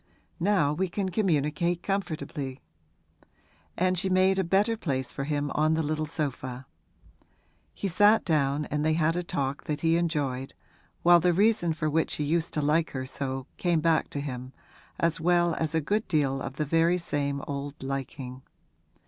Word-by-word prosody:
Now 170 -6 +2
we 185 +4 -1
can 190 +2 -2
communicate 170 -2 0
comfortably.' 155 -8 -3 1.2
And 185 0 +2
she 190 0 -1
made 190 +1 +3
a - - +2
better 200 +6 +2
place 135 - -2
for 140 - -4
him 145 -1 -1
on 155 +1 +2
the 160 - 0
little 155 +1 -1
sofa. 130 -3 -4 1.1
He 200 - -2
sat 205 +4 +4
down 150 -3 +1
and 150 0 0
they 155 0 +2
had 165 +1 +2
a 175 - 0
talk 140 -5 -3
that 150 -1 -3
he 165 0 +3
enjoyed, 145 -6 -2 0.5
while 175 0 +7
the 175 +1 +3
reason 200 -3 +3
for 155 - -1
which 160 +1 0
he 150 - -2
used 165 +3 0
to 150 - 0
like 155 +3 +2
her 130 -1 -3
so 130 0 -4
came 175 -3 +1
back 160 0 +2
to 145 - -4
him, 130 -2 -6 0.5
as 165 -1 +1
well 175 0 +3
as 160 0 -2
a 160 - +2
good 210 +8 -1
deal 140 -4 +1
of 135 - -5
the 150 - -1
very 165 +4 +3
same 140 -5 -2
old 140 0 -5
liking. 135 -1 -5
155 Hz, 175 wpm, -27 LUFS, 140-175 Hz, 1.2 s, while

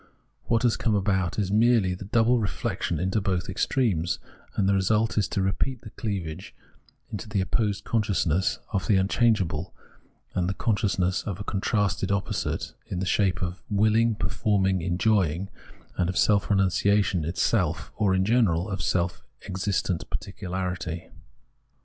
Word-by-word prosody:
"What 115 0 +1
has 120 -2 +3
come 110 -3 +1
about 95 -3 0
is 100 -3 0
merely 110 -3 +4
the 90 +2 -7
double 115 +4 +3
reflection 90 -8 -2
into 95 +4 0
both 95 -2 -1
extremes; 95 -4 0 0.4
and 95 - +2
the 100 - +4
result 105 +3 +2
is 105 -3 +2
to 95 - -1
repeat 110 +6 -1
the 110 - -11
cleavage 95 -6 -5 0.6
into 105 0 -6
the 105 -2 0
opposed 105 +1 0
consciousness 95 -6 +1 0.2
of 100 - -1
the 100 - +4
un 95 0 +2
changeable 95 -8 +1 0.6
and 90 0 0
the 95 - -2
consciousness 95 -4 0
of 100 -2 -5
a - - -4
contrasted 100 -1 0
opposite 100 -1 -2
in 90 - -4
the 95 - -1
shape 95 -1 +1
of 90 +1 -4
willing, 110 +2 +3
performing, 95 -3 +1
enjoying, 90 0 +1 0.5
and 90 -1 +1
of 90 - -2
seK 100 -2 +3
renunciation 100 -2 +2
itself, 85 +1 0
or, 100 -4 +2
in 95 0 +2
general, 100 -5 +2
of 95 - -3
seLf 85 -2 0 0.2
existent 95 -2 -2
particularity. 90 -3 -4
95 Hz, 150 wpm, -26 LUFS, 90-105 Hz, 0.6 s, merely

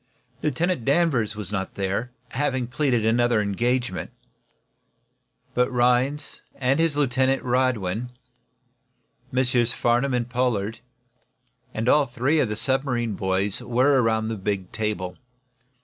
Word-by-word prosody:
Lieutenant 160 +1 0
Danvers 135 -7 +2
was 105 -2 -6
not 95 -2 -3
there, 100 +5 -2 0.2
having 130 -2 -1
pleaded 125 -3 0
another 120 0 +3
engagement. 120 +5 -1 1.4
But 125 +1 +1
Rhinds 125 +4 +1
and 135 +2 +1
his 165 -3 +2
lieutenant, 135 -1 +2
Radwin, 120 -3 0 1.2
Messrs. 125 -2 +2
Farnum 125 +2 +1
and 120 -1 -1
Pollard 120 -4 -1 0.9
and 110 +1 -3
all 145 +2 +4
three 130 +6 +1
of 125 - +1
the 105 - -2
submarine 125 -2 0
boys 95 +1 -1
were 130 +3 +3
around 110 -1 +1
the 110 - -3
big 95 -1 -3
table. 105 -5 -3
120 Hz, 115 wpm, -24 LUFS, 110-130 Hz, 1.4 s, all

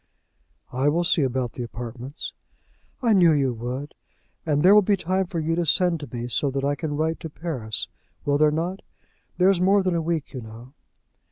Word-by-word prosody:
"I 130 +3 +2
will 170 +4 +1
see 170 -1 +3
about 130 -3 -1
the - - -6
apartments." 120 +4 -7 0.7
"I 230 -2 +4
knew 175 -5 +6
you 135 -4 +1
would. 125 +5 -5 0.5
And 145 -1 +2
there 190 +3 +8
will 210 - +8
be 200 0 +2
time 185 +1 0
for 170 - -3
you 160 +1 0
to 175 +1 +1
send 175 +1 +3
to 145 - -8
me, 120 -1 -4
so 125 +4 0
that 135 0 -2
I 140 +1 +2
can 145 0 -3
write 160 +1 0
to 160 - -6
Paris; 135 -10 -4 0.4
will 145 0 +2
there 155 0 +5
not? 170 +5 -2 0.6
There 185 +1 +5
is 185 -2 0
more 195 +2 +4
than 185 -1 +1
a 170 - +1
week, 160 -3 -2
you 130 - -5
know." 115 +4 -12
150 Hz, 205 wpm, -24 LUFS, 130-175 Hz, 0.7 s, there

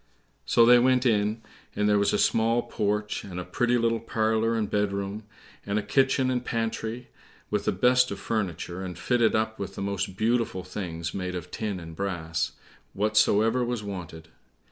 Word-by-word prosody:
So 115 - +5
they 120 +1 +7
went 130 +1 +3
in, 110 -1 +1 0.3
and 105 - +1
there 105 -1 +4
was 100 - +2
a - - +2
small 115 +1 +2
porch, 105 0 -2
and 90 -3 -6
a - - -3
pretty 120 +7 +1
little 115 -1 +1
parlor 110 0 0
and 110 -2 0
bedroom, 100 +1 -2 0.4
and 100 - -2
a 105 - 0
kitchen 135 +2 +2
and 125 -1 -1
pantry, 115 +1 -3 0.4
with - - 0
the - - +2
best 125 0 +3
of - - -5
furniture, 95 -4 -3
and 90 -3 -6
fitted 120 +3 +2
up 110 0 -1
with 100 - -5
the - - -5
most 100 -1 -3
beautiful 115 -4 0
things 85 -3 -5
made 90 -1 -3
of 90 -3 -6
tin 105 -4 -3
and 80 -1 -9
brass, 85 -3 -2 0.4
whatsoever 110 +3 +3
was 120 -3 -2
wanted. 85 -5 -7
105 Hz, 175 wpm, -27 LUFS, 95-115 Hz, 0.4 s, they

